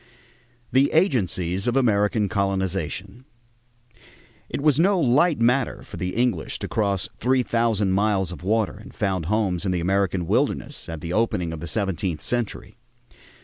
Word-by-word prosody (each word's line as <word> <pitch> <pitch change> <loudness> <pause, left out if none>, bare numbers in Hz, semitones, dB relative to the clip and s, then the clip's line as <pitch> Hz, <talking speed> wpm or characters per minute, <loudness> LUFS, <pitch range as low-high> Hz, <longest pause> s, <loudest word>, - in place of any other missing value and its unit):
THE 135 +2 +3
AGENCIES 95 - +1
OF 120 - +1
AMERICAN 105 -4 +2
COLONIZATION 95 +3 -2 1.3
It - - -3
was 150 0 +3
no 190 +2 +4
light 150 +3 +3
matter 125 +3 +1
for - - -10
the 90 0 -3
English 125 0 0
to - - -5
cross 100 -4 0
three 130 +2 +2
thousand 115 -5 +1
miles 95 -2 +1
of 90 - -8
water 105 +1 0
and - - -13
found 95 -5 -1
homes 100 -4 0
in 95 - 0
the 90 - 0
American 95 0 0
wilderness - - -1
at 80 -2 -6
the 85 +2 -4
opening 95 -6 0
of 80 - -6
the 85 - -6
seventeenth 95 -2 -2
century. 120 -3 -3
100 Hz, 150 wpm, -24 LUFS, 95-120 Hz, 1.3 s, no